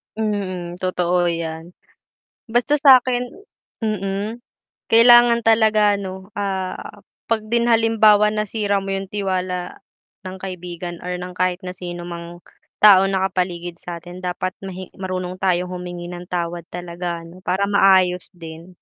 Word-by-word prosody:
Mm, 185 -5 -3
totoo 180 -1 +1
yan. 165 0 -4 0.8
Basta 245 +6 +2
sakin 255 -4 +4 0.5
mm. 210 +2 -3 0.4
Kailangan 235 0 +6
talaga 215 -2 +4
ano 190 0 -8
ah, 190 -2 -4 0.2
pag 225 -2 0
din 235 0 +2
halimbawa 220 -2 +4
nasira 210 -1 -1
mo 195 0 -3
yung 195 0 -5
tiwala 185 -3 -3 0.4
ng 185 0 -6
kaibigan 175 -2 -7
or 180 - -5
ng 180 0 -7
kahit 185 0 0
na 180 - -5
sinumang 175 -1 -7 0.4
taong 195 -2 +7
nakapaligid 180 -2 -2
satin 175 +1 -8
dapat 180 +1 -3 0.4
marunong 185 -1 -4
tayo 180 -1 +1
humingi 180 -1 -7
ng 175 0 -8
tawad 170 -1 -3
talaga 175 0 -5
'no 180 +2 -14
para 190 +2 0
maayos 190 -3 +3
din. 165 -1 -11
185 Hz, 120 wpm, -21 LUFS, 175-210 Hz, 0.8 s, taong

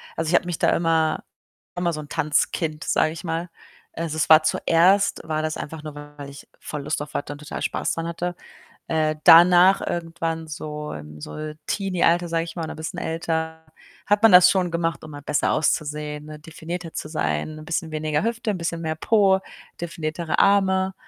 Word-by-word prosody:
Also, 160 -1 -2
ich 175 - +3
habe - - +3
mich 175 -2 -4
da - - +3
immer 160 -2 +1 0.5
immer 175 -1 0
so 155 - -4
'n 145 - -12
Tanzkind, 155 +1 0
sage 155 - +2
ich 165 - -9
mal. 165 0 -3 0.4
Also, 160 -2 -4
es 155 - 0
war 155 0 +8
zuerst 175 +5 +3
war 155 -1 -1
das 155 0 -3
einfach 155 0 -7
nur, 155 -1 -8
weil 145 -1 -10
ich 140 - -12
voll 150 -2 -6
Lust 140 - -2
auf 150 - -8
hatte 145 - -3
und 145 - -12
total 150 - -7
Spaß - - -1
dran 165 0 -4
hatte. 175 +1 -3 0.5
Äh, 155 -1 +1
danach 180 +3 +7
irgendwann 165 -1 -3
so 150 0 -6
im 75 0 -10
so 155 - -6
Teenie-Alter, 175 -3 +1
sage 165 0 0
ich 170 - -9
mal, 160 -2 -3
und - - -6
bisschen 160 +1 -5
älter, 160 0 -3 0.4
hat 205 +2 +2
man 225 - +8
das 180 0 +9
schon 185 -3 0
gemacht, 165 -3 -2
um 155 - -9
mal 145 0 -9
besser 145 +1 0
auszusehen, 150 -1 -1
ne, 155 0 -9
definierter 165 +2 -7
zu - - -5
sein, 80 - -2
'n 155 - -11
bisschen 165 -1 -3
weniger 155 +1 -1
Hüfte, 230 -1 -1
'n 200 - -3
bisschen 170 -1 -3
mehr 160 -1 -2
Po, 195 +2 +3 0.4
definiertere 165 -1 -3
Arme, 190 -1 +3
160 Hz, 195 wpm, -23 LUFS, 155-175 Hz, 0.5 s, das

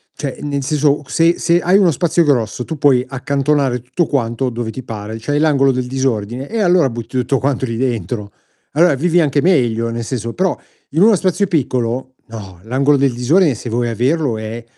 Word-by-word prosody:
cioè 140 -3 -5
nel 145 -1 -2
senso 150 0 +1
se 165 +5 +2
se 170 0 +2
hai 180 +3 +3
uno 185 -5 +4
spazio 170 +3 +1
grosso, 125 -4 0
tu 160 - -5
puoi 130 -3 +3
accantonare 135 -1 0
tutto 130 +8 -1
quanto 125 -2 -1
dove 115 -1 -4
ti 130 - -8
pare, 110 -1 -7
c'hai 145 +5 -1
l'angolo 140 -3 +3
del 125 -1 -2
disordine 130 -1 -2
e 225 0 -2
allora 175 -6 +3
butti 120 +2 -6
tutto 130 +2 0
quanto 135 -1 -1
lì 115 -2 -4
dentro. 115 -4 -3 0.4
Allora 165 -1 +4
vivi 175 +4 +2
anche 145 -2 +1
meglio 120 -10 +1
nel 115 0 -4
senso, 115 -1 -4
però 185 0 0 0.3
in 160 +5 0
uno 215 0 +6
spazio 190 +2 0
piccolo, 130 -5 -1
no, 100 -6 -10
l'angolo 135 +5 +2
del 135 -2 +1
disordine 145 +4 +2
se 120 - -7
vuoi 120 +1 -1
averlo 125 +1 0
è 110 +2 -6
135 Hz, 190 wpm, -17 LUFS, 120-155 Hz, 0.4 s, uno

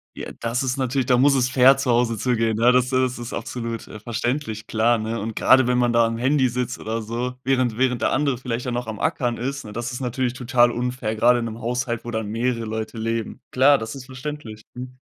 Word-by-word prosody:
Ja, - - -7
das 120 +3 -1
ist 130 +1 -1
natürlich 130 0 0
da 125 0 +3
muss 140 +2 +4
es 130 -1 +2
fair 130 +1 +6
zu 135 -2 0
Hause 120 -1 +2
zugehen, 115 -2 0
ja, 120 +2 +5
das 125 0 +2
das 130 -1 0
ist 120 0 -6
absolut, 115 -2 -5
äh, 110 - -9
verständlich, 120 0 -3
klar, 115 +2 +2
ne? 110 +1 -3
Und 110 +1 -5
grade, 130 -1 +5
wenn 125 0 +2
man 120 -1 +2
da 115 0 +4
am 115 0 -3
Handy 130 +1 +2
sitzt 125 +1 -3
oder 115 +1 -3
so, 120 +3 -3
während 130 -4 +1
während 125 -2 +1
der - - +1
andere 140 -3 0
vielleicht 125 -1 -4
ja 125 - -2
noch 120 0 -3
am 110 -2 -5
Ackern 120 -2 -1
ist, 135 +2 -4
ne, 105 - -8
das 120 +3 -4
ist 125 - -5
natürlich 125 0 -1
total 125 -1 +3
unfair, 125 -2 -3
grade 120 +3 +4
in 115 - -3
'nem 115 0 -6
Haushalt, 120 0 -2
wo 120 - -5
dann 110 -2 -3
mehrere 115 +1 -1
Leute 110 +1 -5
leben. 115 0 -3
Klar, 140 +2 +5
das 110 0 -6
ist 135 -2 -9
verständlich, 130 -5 -7
mhm. 125 +1 -9
120 Hz, 240 wpm, -23 LUFS, 115-130 Hz, -, fair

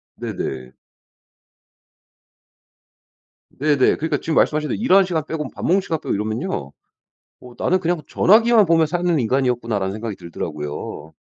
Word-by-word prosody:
네네. 65 -1 -5 2.8
네네. 145 -2 +2
그러니까 160 +1 -1
지금 160 - -2
말씀하신 150 -1 +2
대로 - - -2
일하는 195 -5 +5
시간 160 -5 -2
빼고 150 -4 -4
밥 - - -10
먹는 190 +3 +3
시간 160 -4 -3
빼고 - - -3
이러면은요 110 - -3 0.7
어 125 - -13
'나는 185 - +1
그냥 175 -2 -1
전화기만 225 +2 +5
보며 165 -1 +4
사는 175 0 0
인간이었구나.'라는 115 -5 0
생각이 110 -1 -5
들더라고요. 75 -2 -6
150 Hz, 340 characters per minute, -21 LUFS, 110-175 Hz, 2.8 s, 일하는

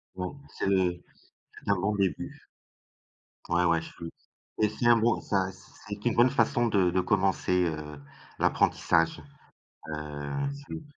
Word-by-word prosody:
Bon, 90 +9 -5
c'est - - -4
le 90 -3 +2 0.5
c'est - - -9
un 100 - +5
bon 100 +3 0
début. 100 -3 -2 1.1
Ouais 85 +1 +2
ouais, 85 -1 +3
je 80 - -9
suis 85 -1 -8 0.5
et 105 - +4
c'est 110 +3 -3
un 120 -1 +7
bon 115 +1 +2
ça 95 -2 0
c 95 - -17 0.3
c'est 105 0 -6
une 120 - +3
bonne 120 +2 +5
façon 120 -2 +2
de 95 -5 +3
de 95 +1 +2
commencer, 95 -1 +2
heu, 75 -2 -5 0.4
l'apprentissage. 85 -1 +2 0.7
Heu, 75 - -4
c'est 140 0 -9
je - - -2
suis 160 - -10
95 Hz, 165 wpm, -28 LUFS, 85-105 Hz, 1.1 s, un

